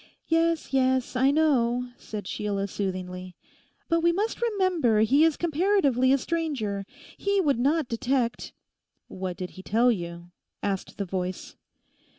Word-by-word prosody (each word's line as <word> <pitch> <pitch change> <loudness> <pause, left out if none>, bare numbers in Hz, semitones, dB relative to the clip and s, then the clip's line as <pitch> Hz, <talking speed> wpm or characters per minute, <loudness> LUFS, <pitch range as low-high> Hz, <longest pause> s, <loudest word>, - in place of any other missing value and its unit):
'Yes, 330 -2 +1
yes, 260 -1 +2
I 260 +2 +4
know,' 250 -5 +2
said 210 -5 -7
Sheila 200 0 -2
soothingly; 185 -2 -5 0.5
'but 335 0 +2
we 340 +1 +3
must 415 +8 -2
remember 370 - +2
he 270 +8 +4
is 325 -2 +3
comparatively 320 - +2
a 275 - +5
stranger. 260 - -2 0.3
He 400 0 +1
would 285 -9 +2
not 295 +3 +2
detect—' 240 +1 -1 0.6
'What 185 -1 -5
did 180 -2 -5
he 185 - -11
tell 230 +6 +3
you?' 170 -3 -5 0.3
asked 195 -2 -3
the 200 - -2
voice. 185 0 -4
250 Hz, 140 wpm, -26 LUFS, 200-320 Hz, 0.6 s, a